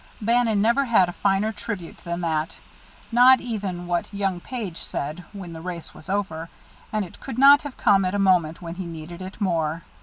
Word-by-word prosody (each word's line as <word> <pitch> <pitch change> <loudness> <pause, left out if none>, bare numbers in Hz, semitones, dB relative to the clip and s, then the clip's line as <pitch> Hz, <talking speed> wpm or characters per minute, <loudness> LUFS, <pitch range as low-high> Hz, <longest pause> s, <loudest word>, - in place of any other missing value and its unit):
Bannon 225 -2 +2
never 235 +5 +3
had 215 -7 +4
a - - -6
finer 200 +3 +1
tribute 205 -5 -6
than 170 0 -3
that, 160 -1 -1 0.5
not 250 +2 +7
even 195 -7 -4
what 175 +2 -1
young 195 -3 -1
Page 205 -5 -5
said 155 +5 -4
when 190 -5 -8
the 160 - -8
race 175 -1 -7
was 155 - -13
over; 170 -5 -2 0.4
and 215 -2 0
it 175 - -14
could 265 -4 -7
not 280 +2 +8
have 290 -3 -8
come 195 -1 +4
at 185 +2 -1
a - - +1
moment 180 -4 +2
when 165 -1 -5
he 180 0 -6
needed 165 +2 -8
it 185 +2 -8
more. 165 -4 0
190 Hz, 195 wpm, -24 LUFS, 170-215 Hz, 0.5 s, not